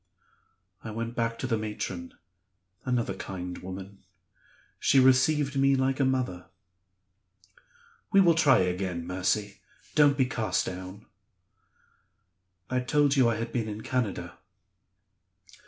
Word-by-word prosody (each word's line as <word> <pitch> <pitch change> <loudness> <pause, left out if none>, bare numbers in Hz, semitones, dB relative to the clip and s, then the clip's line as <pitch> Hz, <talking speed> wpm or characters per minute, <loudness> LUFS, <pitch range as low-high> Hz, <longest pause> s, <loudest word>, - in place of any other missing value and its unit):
I 110 - -6
went 115 +2 -4
back 115 -1 -1
to - - -4
the 115 -4 0
matron 95 -5 -5 0.7
another 120 -6 0
kind 90 -1 -6
woman. 95 +2 -8 0.8
She 135 - +4
received 135 +2 +3
me 135 0 +4
like 130 0 0
a 135 - +3
mother. 125 -9 -1 1.6
'We 195 -2 +6
will 170 -3 +5
try 160 -10 +4
again, 90 -1 -2
Mercy; 95 +3 -1 0.3
don't 145 -2 +4
be 130 - +3
cast 110 -7 -1
down.' 95 +3 -7 1.6
I 125 +4 0
told 140 +3 +2
you 130 -4 +4
I 115 - 0
had 115 +1 -5
been 115 -3 -1
in 105 0 -6
Canada?" 125 -6 -3
115 Hz, 120 wpm, -28 LUFS, 95-130 Hz, 1.6 s, We